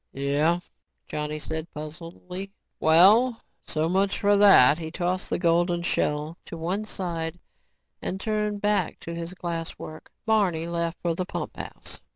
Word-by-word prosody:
"Yeh," 145 +5 +1 0.5
Johnny 150 0 -3
said 160 +1 -4
puzzledly. 170 +5 -7 0.3
"Well, 210 +10 +5 0.2
so 155 +1 -1
much 190 +3 +1
for 205 0 +4
that." 185 -8 +7
He 160 -1 -5
tossed 180 +2 -2
the - - 0
golden 175 0 +2
shell 150 -1 -1
to 170 - -7
one 185 +6 -2
side 170 -5 -4 0.6
and 190 - -3
turned 210 -1 -1
back 210 0 +1
to 170 - -6
his 170 +2 -5
glass 170 -2 -4
work. 155 0 -9 0.2
Barney 195 -8 +2
left 170 0 -2
for 170 -1 +1
the 180 +2 -3
pumphouse. - - -6
170 Hz, 145 wpm, -26 LUFS, 160-190 Hz, 0.6 s, that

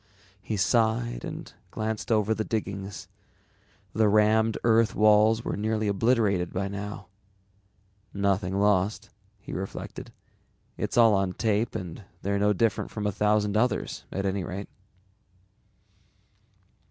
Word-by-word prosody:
_ - - -37 0.4
He 105 +2 -3
sighed 95 - +1
and - - -7 0.2
glanced 110 +1 -3
over 110 0 +3
the 110 - -2
diggings. 100 -4 -4 0.9
The 110 0 +3
rammed 110 +1 +3
earth 115 -2 +3
walls 110 +1 +4
were - - -2
nearly 110 +1 -1
obliterated 100 -4 +1
by 100 +2 -2
now. 100 0 -6 1.1
Nothing 100 -1 0
lost, 100 0 +1 0.3
he - - -10
reflected. 95 +1 -6 0.6
_It's - - -3
all 115 -2 +7
on 95 -2 +1
tape 110 +1 0
and 90 +2 -6 0.2
they're 100 +1 0
no 105 +1 +3
different 105 +1 0
from 105 -1 -5
a 105 - +1
thousand 105 +1 +1
others 125 +4 0
at 100 +1 -3
any 95 -1 -1
rate. 95 +3 -6
105 Hz, 130 wpm, -27 LUFS, 100-110 Hz, 1.1 s, all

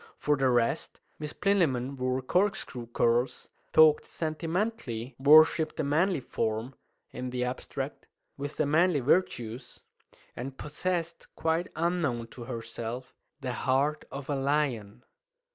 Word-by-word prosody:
For 150 - +2
the 135 -2 +2
rest, 120 -2 0 0.2
Miss 150 -1 -4
Plinlimmon 140 -10 +1
wore 130 0 -1
corkscrew 160 - 0
curls, 120 +2 +1 0.2
talked 155 -1 +6
sentimentally, 160 - -3
worshipped 155 +2 +6
the - - 0
manly 155 +3 +2
form 115 +1 -2 0.4
(in 125 0 -5
the 125 0 -2
abstract) 130 +2 -5 0.3
with 145 +1 -6
the 155 - +2
manly 160 +1 +3
virtues, 120 -5 0 0.5
and 130 +2 -6
possessed 170 +2 -3
(quite 165 +2 0
unknown 155 -9 0
to 120 0 -9
herself) 115 +1 -6 0.3
the 130 -2 -3
heart 140 +5 0
of 140 0 -6
a 145 - 0
lion. 135 -6 -1
135 Hz, 125 wpm, -29 LUFS, 125-160 Hz, 0.5 s, talked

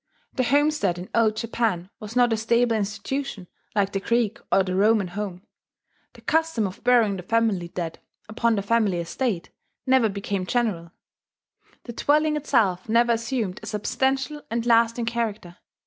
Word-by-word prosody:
The 260 - 0
homestead 285 - +2
in 180 +1 -8
Old 220 -2 +3
Japan 220 -5 -2
was 215 +2 -8
not 245 -2 +4
a - - 0
stable 235 +1 +2
institution 215 +1 -3 0.3
like 200 -1 +1
the 195 - -1
Greek 230 +1 0
or 195 - +4
the 185 -1 -3
Roman 205 0 +3
home; 190 -1 -6 0.7
the - - -16
custom 320 -8 +1
of 190 -1 -7
burying 235 -5 +4
the - - -6
family 210 -3 0
dead 170 -1 -5 0.3
upon 230 +1 +1
the 200 - -2
family 210 -3 +2
estate 170 +3 -2 0.3
never 260 -4 +4
became 200 -2 -3
general; 195 -9 -1 0.9
the 240 - -8
dwelling 300 +4 +2
itself 225 -10 +1
never 235 +1 +4
assumed 230 -4 -2
a - - -9
substantial 265 +7 -1
and 230 0 -2
lasting 230 0 +3
character. 220 -6 -3
225 Hz, 155 wpm, -24 LUFS, 195-240 Hz, 0.9 s, not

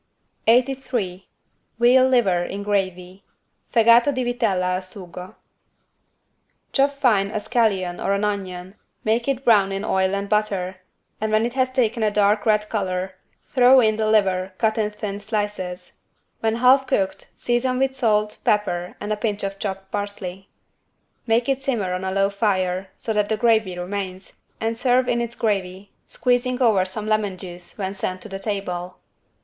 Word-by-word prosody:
83 240 -6 +1 0.5
VEAL 255 +2 +6
LIVER 195 -9 +3
IN 200 +2 -5
GRAVY 190 -2 -2 0.5
(Fegato 235 +3 +5
di 255 -2 -2
vitella 215 -7 0
al 185 - -1
sugo) 185 -1 -9 1.4
Chop 275 0 +4
fine 235 -8 +2
a 215 - -2
scallion 195 -6 0
or 195 - 0
an 200 +1 -1
onion, 190 -3 -3 0.3
make 230 +3 0
it 275 -1 -1
brown 205 -4 +5
in 195 +2 -3
oil 190 -1 +1
and 200 0 -3
butter, 200 -3 -1 0.4
and 220 0 -1
when 215 +1 +3
it 240 - -3
has 260 -1 +1
taken 235 -3 0
a 215 - +3
dark 205 +1 +2
red 210 -1 +3
color, 190 -3 -2 0.3
throw 255 0 +5
in 220 -3 +3
the 215 0 0
liver 190 -3 +2
cut 220 -1 +1
in 210 -1 +1
thin 210 -1 -5
slices. 205 -4 -4 0.4
When 225 0 0
half 255 +3 +4
cooked 190 -4 -1
season 250 +1 0
with 265 0 0
salt, 210 -4 +1
pepper 180 -4 0
and 210 +1 -2
a - - 0
pinch 210 -1 -2
of 195 0 -4
chopped 195 -1 -5
parsley. 200 -2 -5 0.8
Make 230 +1 +2
it 270 -1 0
simmer 225 -9 -1
on 180 +1 -3
a 190 - -2
low 195 +1 +1
fire 190 -3 0
so 225 - -3
that 210 -1 +1
the 220 - +1
gravy 220 -5 +2
remains, 185 +1 -5 0.3
and 225 +1 -1
serve 250 +1 +2
in 235 0 +1
its 235 0 -4
gravy, 195 -3 -2 0.2
squeezing 250 0 0
over 215 -7 +3
some 210 +3 -5
lemon 215 -3 0
juice 175 -1 -10
when 195 -2 -3
sent 185 -2 -4
to - - -9
the 195 0 -6
table. 185 -3 -4
210 Hz, 165 wpm, -22 LUFS, 190-235 Hz, 1.4 s, VEAL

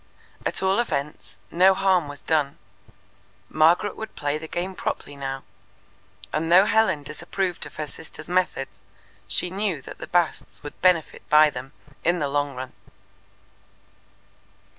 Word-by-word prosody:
At - - -3
all 190 +3 +3
events, 150 -11 -3
no 190 +2 +6
harm 185 -5 +3
was 145 -1 -9
done. 150 -3 +1 0.9
Margaret 165 +6 +4
would 220 0 -7
play 145 +1 -1
the 160 - -7
game 180 +4 -3
properly 145 -5 -4
now, 135 -1 -4 0.9
and 165 +2 0
though 185 +3 +8
Helen 200 -10 +3
disapproved 175 +4 -3
of - - -15
her 155 - -3
sister's 155 +1 -10
methods, 180 -7 -1 0.5
she 180 - -1
knew 195 -4 -1
that - - -10
the - - -7
Basts 175 -2 0
would 145 - -9
benefit 180 -4 +3
by 150 0 +7
them 130 +2 -8 0.3
in 170 +2 +3
the 150 -4 0
long 145 0 -1
run. 130 0 -6
160 Hz, 140 wpm, -25 LUFS, 145-185 Hz, 0.9 s, though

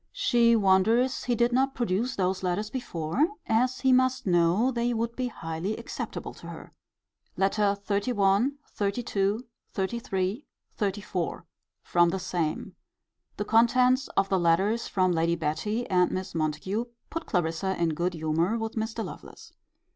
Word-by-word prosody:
She 235 -1 +3
wonders 220 +6 +3
he 245 - +1
did 240 +1 +2
not 270 +2 +2
produce 235 +2 -1
those 185 0 0
letters 190 +4 -2
before, 240 - -1 0.2
as 250 +3 +1
he 265 -1 +4
must 255 0 +2
know 180 +7 +3
they 240 0 0
would 230 +1 -2
be 255 -1 -1
highly 170 -1 -4
acceptable 235 - -6
to - - -12
her. - - -10 0.6
LETTER 200 +1 +2
XXXI. 205 +3 +2 0.2
XXXII. 200 0 0 0.4
XXXIII. 195 +3 -2 0.3
XXXIV. 195 -5 -2 0.4
From 175 -1 +3
the 190 - -1
same. 170 -4 -3 0.6
The 205 - -2
contents 250 +4 +4
of 195 - +3
the 190 -1 +1
letters 190 +7 +2
from 185 -1 +1
Lady 170 0 +1
Betty 170 +9 -2
and 180 -1 +3
Miss 185 0 -4
Montague 165 +8 -1 0.3
put 330 0 -4
Clarissa 175 +1 -1
in 170 -1 +2
good 175 +3 -1
humour 165 +7 0
with 225 0 -3
Mr. 220 0 -3
Lovelace. - - -11
200 Hz, 140 wpm, -27 LUFS, 180-235 Hz, 0.6 s, he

